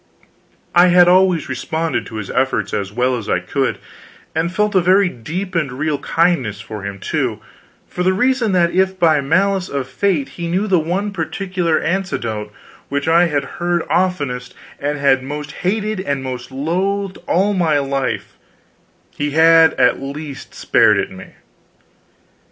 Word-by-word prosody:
I 175 +1 +6
had 175 0 +6
always 180 -2 +4
responded 160 +5 -2
to 110 - -9
his 105 -3 -5
efforts 110 -6 0
as 100 -1 -2
well 125 +3 +1
as 115 -4 -6
I - - +2
could, - - -1 0.6
and 160 +2 -1
felt 210 +3 0
a 190 - +4
very 185 +2 +4
deep 175 - -5
and 155 -6 0
real 145 +3 -2
kindness 160 - 0
for 110 -1 -8
him, 100 0 -5
too, - - -2 0.5
for 180 - -5
the 185 +1 +3
reason 245 +2 +1
that 170 -2 +3
if 190 0 +1
by 160 -5 +3
malice 190 +6 +1
of 140 -2 -3
fate 185 -9 0
he 170 -1 -6
knew 185 +5 0
the 190 -4 +3
one 190 +6 -2
particular 175 -1 -1
anecdote 120 - -2 0.4
which 140 +2 -2
I 170 +2 +5
had 145 -3 -1 0.2
heard 175 -1 +1
oftenest 145 -9 -1 0.2
and 145 +1 -2
had 140 -2 +3
most 145 +2 -6
hated 210 +2 -2
and 140 -8 -2
most 125 -1 -6
loathed 185 +8 -2
all 195 +4 +2
my 165 -6 +2
life, 135 -4 -2 0.7
he 145 0 -3
had 165 0 +6
at - - +2
least 140 +1 -7
spared - - +3
it - - -2
me. 95 0 -12
165 Hz, 160 wpm, -18 LUFS, 135-185 Hz, 0.7 s, I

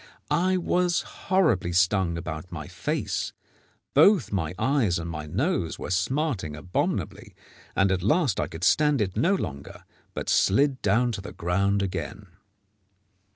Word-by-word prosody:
I 185 +2 +2
was 180 0 +1
horribly 160 - 0
stung 90 -1 +2
about 85 0 -6
my 80 -3 -6
face, - - -3 0.6
both 160 - +5
my 90 -4 -2
eyes 115 -6 +1
and 85 0 -5
my 75 -2 -5
nose 95 - -1
were - - -6
smarting 95 - -1
abominably, 90 +4 -3 0.4
and 95 -1 +3
at 95 -1 0
last 130 - +2
I - - 0
could 80 +2 -9
stand 145 - +3
it 100 -3 -1
no 185 +5 +2
longer, 70 - -6 0.3
but - - -4
slid 135 +6 +3
down 120 +5 +2
to 100 - -5
the 100 - -9
ground 100 +4 0
again. 100 +2 -5
100 Hz, 145 wpm, -26 LUFS, 85-145 Hz, 0.6 s, both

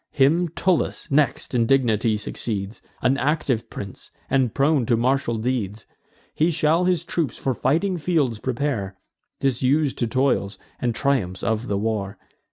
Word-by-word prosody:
Him 160 +6 +3
Tullus 170 -1 0
next 140 -1 +1
in 115 -2 +2
dignity 115 -4 +2
succeeds, 105 0 -4 0.2
An 130 +2 +3
active 140 -5 0
prince, 100 -2 -8 0.2
and 130 -4 +2
prone 140 +1 +2
to 120 - +3
martial 125 -1 +1
deeds. 110 -3 -2 0.5
He 160 +3 +2
shall 165 +2 +2
his 180 -3 +1
troops 165 -4 -2
for 135 - -1
fighting 170 - 0
fields 145 -9 0
prepare, 120 -7 -2 0.5
Disus'd 135 +2 +1
to 120 - +1
toils, 125 -5 0 0.2
and 120 -2 -1
triumphs 110 -9 0
of 110 +3 -1
the 100 - 0
war. 105 -2 -2
130 Hz, 145 wpm, -23 LUFS, 110-150 Hz, 0.5 s, Him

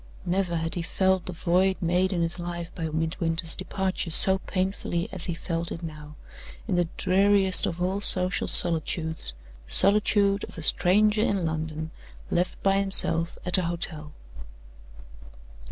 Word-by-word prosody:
Never 180 -1 -1
had 165 0 -3
he 175 - +1
felt 190 +1 -1
the - - -3
void 185 +2 0
made 180 +2 0
in 175 -3 -1
his 170 +1 -3
life 170 -1 -6
by 165 -2 -5
Midwinter's 165 +1 0
departure 190 -2 -3
so 190 +3 +8
painfully 185 -3 -3
as 185 -4 -3
he 170 - -4
felt 165 0 -4
it 165 - -7
now, 150 -2 -9 0.5
in 195 - -1
the 175 -1 +1
dreariest 195 0 +5
of 170 - -5
all 185 +3 -2
social 185 -2 +1
solitudes 160 - -2 0.3
the - - -13
solitude 200 0 +2
of - - -15
a 165 - -7
stranger 210 +7 +3
in 195 -5 0
London, 160 0 -4 0.4
left 180 +1 -2
by 195 0 +2
himself 170 -4 0
at 180 +1 +1
a 180 - -2
hotel. 160 -3 -5
175 Hz, 155 wpm, -25 LUFS, 165-190 Hz, 0.5 s, so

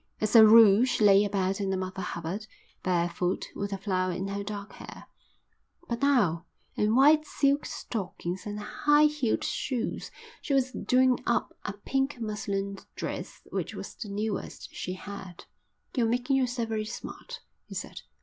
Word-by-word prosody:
As 215 +2 -1
a 225 - +11
rule 220 0 +8
she 255 -4 +1
lay 200 0 +7
about 195 -1 0
in 195 -1 -1
a 190 - 0
Mother 185 +1 -4
Hubbard, 175 +6 -4 0.3
barefoot, 175 0 0
with 200 0 -3
a 195 - -2
flower 185 -2 -1
in 185 +3 -3
her 200 0 -3
dark 205 0 -6
hair; - - -11 0.8
but 235 +1 -3
now, 205 - +2 0.3
in 210 +2 +1
white 300 +4 +6
silk 285 -1 +1
stockings 190 -3 -5
and 210 0 -4
high 295 +8 +3
heeled 300 -6 0
shoes, 250 -4 -2 0.3
she 280 - 0
was 260 -1 +2
doing 255 -1 +2
up 235 - 0
a 205 - -3
pink 270 +6 -2
muslin 200 -3 -3 0.2
dress - - -5
which - - -3
was - - -7
the 215 - -7
newest 210 +1 -4
she 180 - -4
had. 190 -2 -9 0.5
"You're 235 -4 +2
making 245 +3 +1
yourself 245 -3 0
very 215 -1 -1
smart," 480 - -8 0.3
he - - -9
said. - - -6
210 Hz, 160 wpm, -28 LUFS, 195-250 Hz, 0.8 s, a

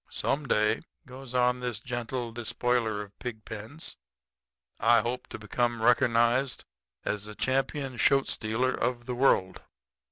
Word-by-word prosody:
Some 140 +1 -1
day,' 105 0 +2 0.2
goes 130 0 -9
on 125 0 +3
this 120 -4 -3
gentle 120 0 -3
despoiler 115 -2 0
of 100 0 -16
pig 110 -3 -6
pens, 110 +9 -6 0.8
'I 120 -1 +5
hope 120 +3 -3
to - - -7
become 120 +3 -1
reckernized 120 +2 +3 0.4
as 105 -1 -2
the 105 0 -8
champion 130 +3 -1
shoat 135 +3 +4
stealer 115 +4 0
of 120 -1 -1
the 125 - -3
world.' 120 -7 +2
120 Hz, 135 wpm, -29 LUFS, 110-125 Hz, 0.8 s, I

